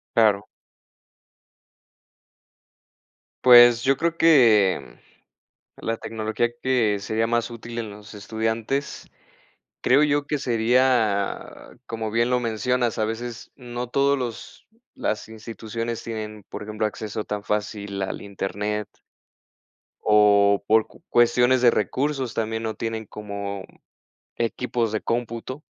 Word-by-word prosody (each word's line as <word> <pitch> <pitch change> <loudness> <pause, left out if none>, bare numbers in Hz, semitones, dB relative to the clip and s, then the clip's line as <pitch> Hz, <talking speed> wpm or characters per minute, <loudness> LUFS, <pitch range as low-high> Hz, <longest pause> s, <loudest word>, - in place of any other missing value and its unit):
Claro. 105 -2 +3 3.0
Pues, 120 -1 +8
yo 135 0 +3
creo 170 +2 -1
que 115 - +4 0.8
la 115 0 -3
tecnología 110 +2 -2
que 120 -6 +2
sería 110 +3 -1
más 120 +1 0
útil 120 0 -8
en 115 -2 -3
los 105 0 -12
estudiantes, 110 +6 -3 0.8
creo 135 +4 +4
yo 145 -1 +2
que 150 - -1
sería, 115 -4 +2 0.4
como 110 -1 -4
bien 115 +2 +1
lo 125 - +2
mencionas, 120 +1 0
a 110 - +1
veces 115 +2 -6
no 120 -1 -6
todos 140 +2 +2
los 120 -3 -6 0.3
las 110 +1 -3
instituciones 115 +1 -5
tienen, 110 -2 -6
por - - -7
ejemplo, 110 0 -2
acceso 105 0 -5
tan 105 -1 -4
fácil 105 -1 -3
al 95 - -3
internet. 105 +1 -3 1.2
O 100 -1 +4
por 110 0 +4
cu - - -20
cuestiones 120 +1 +4
de 120 -2 +6
recursos 130 +5 -1
también 110 0 -2
no 110 -1 -3
tienen 115 -1 -4
como 100 -1 -6 0.7
equipos 120 -1 -1
de 110 - -1
cómputo. 120 +3 -3
115 Hz, 115 wpm, -24 LUFS, 105-120 Hz, 3.0 s, Pues